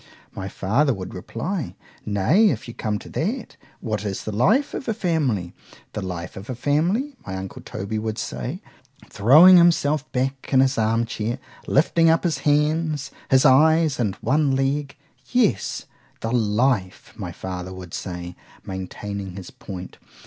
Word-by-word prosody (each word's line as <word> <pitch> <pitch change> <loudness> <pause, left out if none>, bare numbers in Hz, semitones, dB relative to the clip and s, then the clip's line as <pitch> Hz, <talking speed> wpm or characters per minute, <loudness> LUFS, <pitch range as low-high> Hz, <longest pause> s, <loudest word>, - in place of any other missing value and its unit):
my 95 - -5
father 125 +10 +1
would 95 -1 -7
reply.——Nay, 145 - 0
if - - -3
you 120 - -7
come 105 -3 -2
to - - -11
that—what 155 - -4
is 100 -2 -3
the 110 - -4
life 215 - +2
of 265 - -5
a 225 - 0
family?——The 130 - -3
life 90 -2 -5
of 100 +5 -9
a 130 - -3
family!—my 170 - -1
uncle 95 0 -7
Toby 100 +3 -4
would 110 0 -3
say, 65 -1 -5 0.5
throwing 155 - +8
himself 155 -4 +3
back 135 +1 -2
in 130 - +5
his 130 -2 +3
arm 115 +1 +2
chair, 115 0 -3
and 135 - -7 0.4
lifting 165 +3 +4
up 165 0 +3
his 170 -3 0
hands, 150 0 +1 0.2
his 130 +1 +5
eyes, 155 +2 +5
and 105 -5 0
one 140 +2 +2
leg——Yes, 140 - -1 0.4
the 115 - -2
life,——my 110 -3 0
father 95 -1 -6
would 90 -2 -9
say, 90 -1 -5 0.3
maintaining 95 0 -6
his 95 -2 -8
point. 95 -2 -9
125 Hz, 140 wpm, -23 LUFS, 100-155 Hz, 0.5 s, throwing